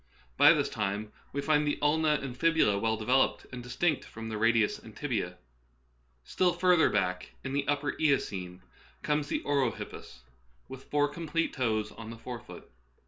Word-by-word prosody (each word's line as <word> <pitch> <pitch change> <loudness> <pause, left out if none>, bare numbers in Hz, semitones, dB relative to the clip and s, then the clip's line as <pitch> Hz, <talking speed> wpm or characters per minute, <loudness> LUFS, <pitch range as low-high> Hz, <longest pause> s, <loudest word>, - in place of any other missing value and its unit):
By - - +8
this - - +1
time 105 +2 -3 0.2
we 140 - -2
find 150 -1 +2
the 145 - 0
ulna 150 +1 +3
and 130 -3 -5
fi.bula 155 -8 +3
well 110 +1 0
devel 125 +5 +4
oped - - -4
and 125 -1 -6
distinct 135 +6 0
from 115 0 -8
the 110 - -3
radius 115 -1 +3
and - - -14
tibia. - - -2 0.9
Still 180 - +1
further 180 -3 +4
back, 90 -3 -1
in 135 - -4
the 140 0 -1
upper 145 0 0
Eocene, 95 - 0 0.4
comes 150 -1 0
the - - -2
orohippus, 135 - -2 0.5
with 130 0 -10
four 145 0 +2
complete 165 +2 -2
toes 110 -5 -1
on 115 -1 -9
the 115 - -8
fore 120 +1 -7
foot. - - -13
130 Hz, 170 wpm, -30 LUFS, 110-150 Hz, 0.9 s, By